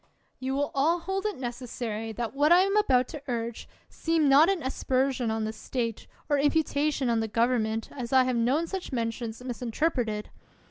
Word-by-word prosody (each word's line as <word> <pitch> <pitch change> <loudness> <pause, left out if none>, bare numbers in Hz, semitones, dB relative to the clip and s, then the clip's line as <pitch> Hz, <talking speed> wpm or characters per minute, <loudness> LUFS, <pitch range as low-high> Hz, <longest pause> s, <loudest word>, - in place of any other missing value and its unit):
You 265 +1 -2
will 285 +1 -1
all 320 +5 +2
hold 385 +3 -2
it 420 - -4
necessary 240 -3 -4
that 230 +1 -4
what 290 +3 +3
I 355 +1 +8
am 395 +1 +1
about 255 -13 +3
to 300 - -7
urge 235 -2 -4 0.2
seem 325 -2 0
not 285 +5 +6
an 385 -5 0
aspersion 260 -1 0
on 220 0 -1
the 215 0 -3
state 230 0 -4 0.2
or 290 -2 +2
imputation 290 -1 +1
on 230 -1 +2
the 225 - -1
government, 225 -1 0
as 245 -4 -6
I 260 -1 +6
have 255 -1 0
known 255 +8 +2
such 375 -1 -5
mentions 230 -1 -3
misinterpreted. 245 -3 -2
255 Hz, 180 wpm, -28 LUFS, 230-300 Hz, 0.2 s, I